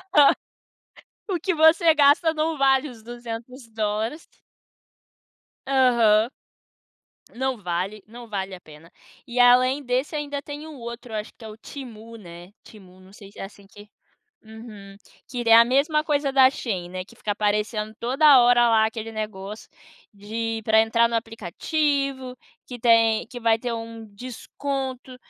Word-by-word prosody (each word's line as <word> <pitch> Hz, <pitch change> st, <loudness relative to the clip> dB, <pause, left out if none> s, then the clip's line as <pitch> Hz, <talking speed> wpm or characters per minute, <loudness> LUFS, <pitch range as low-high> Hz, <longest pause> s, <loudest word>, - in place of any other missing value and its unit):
Aham. 290 Hz, -2 st, +7 dB, 1.0 s
O 355 Hz, -3 st, -1 dB
que 365 Hz, +2 st, -1 dB
você 320 Hz, +1 st, +5 dB
gasta, 295 Hz, +3 st, +4 dB
não 315 Hz, +1 st, -1 dB
vale 270 Hz, +1 st, +3 dB
os 230 Hz, -3 st, -13 dB
200 240 Hz, +1 st, -8 dB
dólares. 220 Hz, +6 st, -3 dB, 1.4 s
Aham. 235 Hz, -4 st, +3 dB, 1.0 s
Não 265 Hz, 0 st, -2 dB
vale, 190 Hz, +2 st, -4 dB
não 235 Hz, +2 st, -12 dB
vale 195 Hz, -3 st, -4 dB
a 180 Hz, -, -9 dB
pena. 155 Hz, +1 st, -16 dB, 0.3 s
E, 250 Hz, -2 st, -5 dB
além 255 Hz, +3 st, +5 dB
desse, 255 Hz, +4 st, -2 dB
ainda 290 Hz, -1 st, -4 dB
tem 295 Hz, +2 st, -8 dB
um 310 Hz, -, -10 dB
outro, 235 Hz, -1 st, -9 dB
eu 215 Hz, -, -2 dB
acho 210 Hz, -, -6 dB
que 225 Hz, -, -12 dB
é -, -, -7 dB
o 215 Hz, -, -10 dB
Temu, 230 Hz, -2 st, -11 dB
né, 175 Hz, -1 st, -12 dB
Temu, 185 Hz, -4 st, -17 dB
não 185 Hz, +1 st, -18 dB
sei 200 Hz, -1 st, -14 dB
se -, -, -16 dB
é -, -, -5 dB
assim 200 Hz, 0 st, -16 dB
que 205 Hz, +1 st, -16 dB, 0.5 s
uhum. 220 Hz, -3 st, -12 dB, 0.3 s
Que 250 Hz, -, -6 dB
ele 235 Hz, -1 st, -1 dB
é -, -, +10 dB
a 230 Hz, -, +9 dB
mesma 280 Hz, +5 st, +1 dB
coisa 290 Hz, -3 st, 0 dB
da 265 Hz, -1 st, +6 dB
Shein, 195 Hz, -10 st, -5 dB
né, 185 Hz, 0 st, -6 dB
que -, -, -18 dB
fica 210 Hz, -, -4 dB
aparecendo 210 Hz, +1 st, -1 dB
toda 270 Hz, +3 st, +5 dB
hora 240 Hz, 0 st, +5 dB
lá 220 Hz, -1 st, +4 dB
aquele 225 Hz, 0 st, -7 dB
negócio 215 Hz, -1 st, -7 dB, 0.4 s
de 225 Hz, +2 st, -4 dB
pra 220 Hz, 0 st, +4 dB
entrar 230 Hz, +1 st, +2 dB
no 230 Hz, -, -3 dB
aplicativo, 260 Hz, -, -2 dB, 0.3 s
que 245 Hz, -2 st, -9 dB
tem 225 Hz, -2 st, +3 dB
que 245 Hz, -, -9 dB
vai 225 Hz, -1 st, +2 dB
ter 240 Hz, -1 st, -3 dB
um 225 Hz, 0 st, -7 dB
desconto, 260 Hz, +2 st, -6 dB
230 Hz, 160 wpm, -23 LUFS, 215-265 Hz, 1.4 s, é